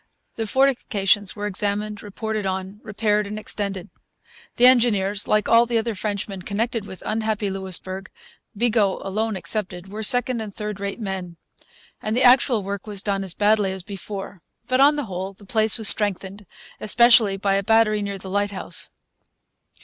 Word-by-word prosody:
The 225 -1 -3
fortifications 210 -6 +1
were 205 -1 -5
examined, 210 +1 -1
reported 215 +1 -4
on, 190 +1 -4
repaired, 210 -1 -1
and 210 +1 -6
extended. 200 -3 -3 0.6
The 245 - +4
engineers, 210 -6 +3
like 215 -1 +2
all 230 +1 +5
the 235 -1 0
other 225 0 -1
Frenchmen 200 -1 -4
connected 215 +2 -3
with 190 - -10
unhappy 215 -2 -1
Louisbourg, 190 0 -1 0.5
Bigot 235 0 +2 0.2
alone 215 +3 -2
excepted, 180 0 -3
were 210 +2 -6
second 245 0 +1
and 210 -3 -8
third 210 -2 -5
rate 200 +3 -4
men; 190 -5 -5 0.6
and 215 +2 -2
the 255 - +3
actual 245 -3 +5
work 200 +1 -6
was 205 -2 -1
done 195 -1 -1
as 185 -2 -6
badly 205 -2 +2
as 190 -1 -7
before. 195 -1 -8 0.3
But, 255 +1 +2
on 290 +2 +6
the 290 -2 -3
whole, 190 0 -5
the 200 +1 -17
place 220 +2 +2
was 220 -3 +5
strengthened, 200 -1 +2 0.3
especially 225 -2 +4
by 195 0 0
a 195 - +2
battery 215 0 +3
near 200 -1 -4
the 190 - -11
lighthouse. 205 0 -2
205 Hz, 165 wpm, -22 LUFS, 195-220 Hz, 0.6 s, on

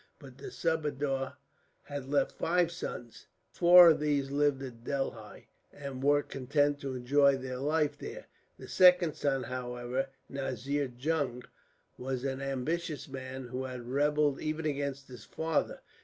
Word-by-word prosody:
But - - -14
the 405 - -7
subadar 145 - -1 0.5
had 140 -2 -7
left 140 -1 +2
five 175 0 +1
sons. 120 -8 -7 0.2
Four 175 0 +8
of - - +1
these 145 -2 0
lived 145 -1 +1
at 120 -3 -9
Delhi, 120 -6 -4 0.2
and 140 -2 -7
were 145 +1 +3
content 145 +2 0
to 135 -2 -4
enjoy 140 +2 +3
their 130 -1 -5
life 150 0 0
there. - - -8 0.3
The - - -11
second 180 -3 +5
son, 135 -3 -1
however, 125 +1 -3 0.2
Nazir 135 +1 -3
Jung, 135 -3 -1 0.6
was 130 0 -3
an 135 0 -2
ambitious 145 +4 -3
man, 130 -1 -7
who 130 +1 -4
had 125 -2 -7
rebelled 145 +1 +1
even 155 +1 -3
against 140 -2 -2
his 125 -3 -11
father. 160 -1 -2
140 Hz, 140 wpm, -31 LUFS, 130-150 Hz, 0.6 s, Four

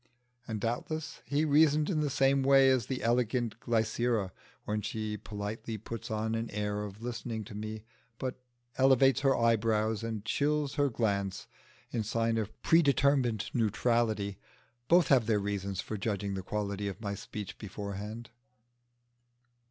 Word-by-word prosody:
and 110 -2 -3
doubtless 155 +8 -3
he 145 +5 +1
reasoned 150 0 +4
in 160 -5 0
the 150 - 0
same 135 0 +3
way 135 0 +6
as 125 -5 +1
the 130 -1 -3
elegant 120 -1 +1
Glycera 115 -3 0 0.3
when 105 0 -1
she 110 0 -3
politely 105 +2 -5
puts 110 +2 -7
on 110 0 -1
an 115 0 -2
air 105 0 -2
of 105 +2 -8
listening 115 -2 -4
to 105 - -10
me, 110 +1 -5 0.3
but 130 0 -4 0.4
elevates 135 0 +5
her 135 -1 +3
eyebrows 110 -1 +2
and 110 -2 -4
chills 145 -1 0
her 145 0 +2
glance 100 -5 -1 0.5
in 115 - -1
sign 115 +1 0
of 110 0 -5
predetermined 140 - +3
neutrality: 110 -3 +1 0.5
both 175 +1 +5
have 125 -5 +4
their 110 -2 +3
reasons 100 -2 -2
for 110 - -5
judging 100 -1 -2
the 95 - -3
quality 100 +1 -3
of 100 - -5
my 100 -3 -3
speech 105 0 -7
beforehand. 105 +3 -6
115 Hz, 145 wpm, -31 LUFS, 105-130 Hz, 0.5 s, way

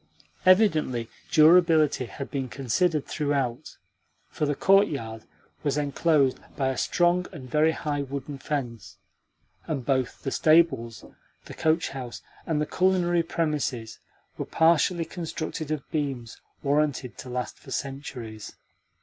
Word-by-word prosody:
Evidently 155 - +4 0.2
durability 160 -4 +5
had 135 +3 -7
been 135 -3 -3
considered 150 +5 0
throughout, 140 -5 -2 0.5
for 150 - -2
the 145 - 0
courtyard 140 - +2 0.4
was 145 -1 0
enclosed 145 -1 +2 0.2
by 135 -2 0
a 135 - -2
strong 175 +1 +2
and 140 -8 -9
very 155 +1 +4
high 150 -3 -2
wooden 140 0 -6
fence, 125 -8 -4 0.7
and 135 -6 -3
both 130 -2 -1
the 135 - -2
stables, 155 -9 +3 0.4
the - - -9
coach 160 +1 +1
house, 130 -3 -7 0.2
and 160 -2 0
the 150 - +1
culinary 180 -1 +2
premises 150 -9 -2 0.4
were - - -2
partially 165 +1 +3
constructed 160 -3 -5
of 155 -3 -3
beams 135 -7 -3 0.2
warranted 140 -3 0
to 125 - -8
last 125 0 -4
for - - -15
centuries. 125 -6 -6
145 Hz, 125 wpm, -26 LUFS, 130-160 Hz, 0.7 s, durability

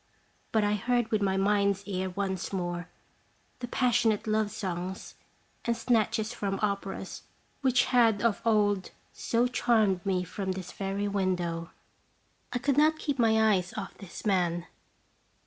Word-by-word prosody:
But 220 -1 +3
I 205 0 +2
heard 240 +3 0
with 215 -2 +2
my 190 -1 +1
mind's 200 0 +2
ear 190 -2 -2
once 190 -1 -3
more 175 -2 -3 0.7
the 245 - -4
passionate 230 -3 +2
love 215 -1 +1
songs 185 -2 -5 0.5
and 235 -1 0
snatches 225 -1 +1
from 200 -4 -2
operas 200 -1 -3 0.4
which 255 -2 +3
had 230 -4 +3
of 230 -3 +2
old 205 -4 +2 0.2
so 235 +1 +1
charmed 220 -6 +2
me 185 -2 0
from 190 +2 -3
this 185 -1 -7
very 195 +1 -2
window. 180 -4 -1 0.8
I - - 0
could 275 +2 0
not 310 +1 +5
keep 285 -4 -2
my 220 -2 +4
eyes 180 -2 -1
off 205 - -5
this 195 +1 -9
man. 175 -4 +1
205 Hz, 145 wpm, -29 LUFS, 190-230 Hz, 0.8 s, not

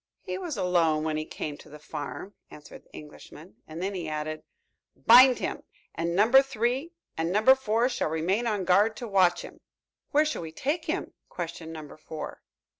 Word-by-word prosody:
"He - - -4
was 340 - -5
alone 170 -5 +2
when 155 -1 -1
he 155 0 -3
came 150 -2 -6
to - - -15
the 150 - -11
farm," 150 +6 -7 0.2
answered 150 - -13
the - - -30
Englishman. 150 +2 -13
And 160 +3 -7
then 195 +1 -2
he 175 -4 -4
added: 155 0 -4 0.5
"Bind 250 +2 +7
him, - - -4 0.3
and 170 +1 -2
Number 230 +7 +6
Three 270 +5 -2 0.2
and 165 +1 -1
Number 215 +7 +6
Four 235 -2 +1
shall 250 - -2
remain 185 +9 0
on 205 -4 -1
guard 205 +5 +3
to 240 - -6
watch 185 -4 +3
him." - - -12 0.5
"Where 300 +2 +3
shall 305 - -3
we 160 -1 -7
take 305 - -2
him?" 335 +4 -3 0.2
questioned 165 -2 -6
Number 155 -2 -9
Four. 155 0 -8
185 Hz, 185 wpm, -27 LUFS, 160-240 Hz, 0.5 s, Bind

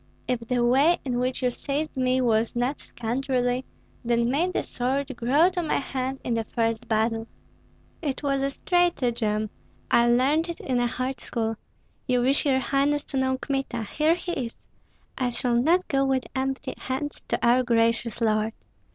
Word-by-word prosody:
"If 250 -2 0
the 240 +1 0
way 280 +8 +4
in 245 -2 -1
which 255 +1 -1
you 250 - +2
seized 290 +5 -3
me 255 0 +2
was 230 -2 +1
not 245 +4 0
scoundrelly, 250 +1 -1 0.4
then 235 0 +1
may 325 +7 +1
the 365 - -1
sword 270 +2 -2
grow 285 +10 +3
to 360 -1 -1
my 320 - 0
hand 265 -1 -3
in 240 - -1
the 230 -1 0
first 225 0 -1
battle." 225 +1 0 0.7
"It 290 -3 -3
was 275 -1 +1
a 275 - +1
stratagem! 240 - 0 0.4
I 235 0 +5
learned 275 +8 +3
it 340 - -5
in 255 -2 -1
a 245 - +2
hard 255 +2 -3
school. 225 -2 -1 0.5
You 250 -2 +2
wish, 270 +4 +2
your 265 -2 +4
highness, 280 +2 +1
to - - 0
know 260 0 +1
Kmita. 270 -4 -2
Here 305 +9 +2
he 355 0 -5 0.2
is! 230 - -14 0.6
I 255 -2 +1
shall 245 0 +1
not 325 +10 +3
go 275 -1 +2
with 265 -1 +1
empty 265 0 -2
hands 270 +3 -4
to - - 0
our 245 +2 +5
gracious 230 -1 +1
lord." 215 0 +1
255 Hz, 175 wpm, -26 LUFS, 235-275 Hz, 0.7 s, I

